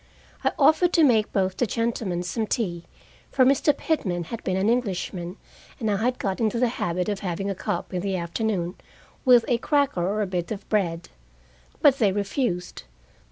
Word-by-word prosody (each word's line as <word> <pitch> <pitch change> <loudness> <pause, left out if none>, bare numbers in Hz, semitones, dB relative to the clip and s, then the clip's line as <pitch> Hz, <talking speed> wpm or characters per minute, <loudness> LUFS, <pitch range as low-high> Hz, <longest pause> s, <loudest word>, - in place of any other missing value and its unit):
I - - +2
offered 350 +3 +4
to 330 - +5
make 225 -7 +3
both 190 -1 0
the 245 - +1
gentlemen 220 -6 -1
some 220 +5 -2
tea, 175 -8 -2 0.4
for 260 - +3
Mr. 275 +3 +4
Pitman 205 - -1
had 225 +7 -7
been 185 0 -1
an 190 +2 +1
Englishman, 190 -6 -1 0.4
and 220 -4 0
I 200 - +1
had 245 +4 0
got 195 -2 -2
into 225 +1 +1
the 245 0 +2
habit 180 -6 -2
of 205 -2 -2
having 195 +1 -3
a - - -1
cup 190 -1 -4
in 180 - -1
the 195 0 -1
afternoon, 175 0 -2 0.5
with 245 -2 +6
a 240 -2 +1
cracker 280 - +1
or 205 +4 0
a - - 0
bit 180 -1 -3
of 205 -2 -5
bread. 175 -6 -1 0.7
But 275 -2 +6
they 210 -5 +4
refused. 195 -2 -2
205 Hz, 185 wpm, -25 LUFS, 180-240 Hz, 0.7 s, with